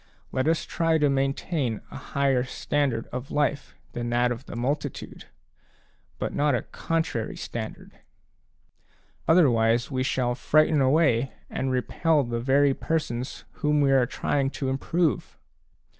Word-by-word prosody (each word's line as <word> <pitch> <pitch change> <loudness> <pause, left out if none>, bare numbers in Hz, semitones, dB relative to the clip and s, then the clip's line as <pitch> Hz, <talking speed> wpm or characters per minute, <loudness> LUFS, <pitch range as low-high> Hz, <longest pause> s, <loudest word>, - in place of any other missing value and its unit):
Let 130 +2 0
us 165 0 +1
try 165 -1 +1
to 145 -2 +3
maintain 135 - -1
a - - -9
higher 140 -2 0
standard 130 -2 -1
of 125 +2 -5
life 145 -1 -1 0.2
than 120 0 -3
that 120 +1 +2
of 120 +2 -6
the - - -7
multitude, 140 +4 -3 0.9
but - - -3
not 145 -2 +2
a - - -2
contrary 160 -9 -2
standard; 110 -2 -7 1.3
other 165 -1 +6
wise, 115 +3 +2
we 130 -1 -1
shall 130 -2 0
frighten 150 +4 +3
away 135 -3 +3 0.2
and 130 - -2
repel 145 +4 +1
the 120 -1 -3
very 140 +2 +3
persons 130 -6 -3 0.2
whom 150 0 +2
we 140 -1 +3
are 130 -2 +4
trying 140 +2 0
to 135 0 -3
improve. 160 +5 -1
135 Hz, 140 wpm, -26 LUFS, 125-150 Hz, 1.3 s, other